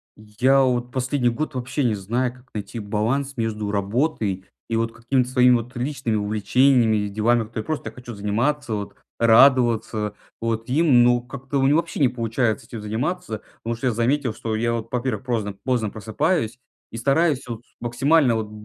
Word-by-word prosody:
Я 125 +6 +2
вот 125 -1 0
последний 130 0 0
год 145 +4 -3
вообще 130 +3 -2
не 115 -4 +2
знаю, 120 +6 -1
как 125 0 -19
найти 105 +2 -5
баланс 115 +7 -1
между 110 -3 -2
работой 100 - -1 0.2
и 115 - 0
вот 115 0 -1
какими-то 125 +2 0
своими 125 -1 +5
вот 120 +2 -4
личными 125 -2 -2
увлечениями 110 +3 +3
и 105 0 -1
делами, 110 +4 +2
которые 110 0 -5
я - - -12
просто 155 -8 -3
хочу 120 0 -10
заниматься, 115 +6 -1
вот 100 -1 -6 0.2
радоваться 115 -3 +4 0.3
вот 115 0 -2
им, 135 -3 +5
ну, 120 0 +4
как-то 135 +3 -4
у - - +2
меня 140 +2 +4
вообще 170 +1 -1
не 135 -4 +4
получается 115 -2 -1
этим 115 -4 -7
заниматься. 110 - -3 0.2
Потому 115 +1 -2
что 120 +3 -2
я 120 - +1
заметил, 120 +2 0
что 110 -1 -3
я 115 +2 0
вот, 115 -1 -3
во-первых, 125 -3 -2
прозно 110 -5 -1
поздно 125 -5 0
просыпаюсь 115 - -1 0.3
и 115 - -6
стараюсь 140 +2 +1
вот 115 -2 -6 0.2
максимально 125 +2 +3
вот 110 -1 -2
б - - -15
120 Hz, 180 wpm, -23 LUFS, 110-130 Hz, 0.3 s, своими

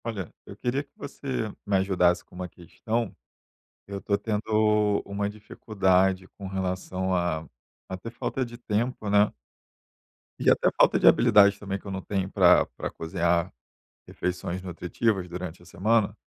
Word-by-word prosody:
Olha, 105 -7 -5
eu - - -10
queria 130 +3 -1
que 140 - -32
você 130 -6 -4
me 100 -1 0
ajudasse 90 -2 +2
com - - -26
uma 90 0 -6
questão, 110 +6 -4 0.7
eu 100 0 -5
estou 100 +1 0
tendo 105 -1 +1
uma 100 +1 -2
dificuldade 95 -3 +1
com 100 - -7
relação 95 0 -2
a 85 -3 -1 0.4
a 95 - -4
ter 115 +5 -7
falta 130 +2 -2
de 120 0 -10
tempo, 115 -1 -2
né. 105 +1 +5 1.1
E - - +3
até - - +4
falta - - +5
de - - +4
habilidade, 100 0 +6
também, 100 -1 -4
que - - -25
eu 100 - -5
não 95 0 -4
tenho 95 -2 -2
pra - - +6
pra - - -6
cozinhar 85 0 0 0.6
refeições 90 0 -3
nutritivas 90 +2 -1
durante 90 -1 -7
a - - -17
semana, 105 +4 +1
100 Hz, 155 wpm, -26 LUFS, 90-105 Hz, 1.1 s, habilidade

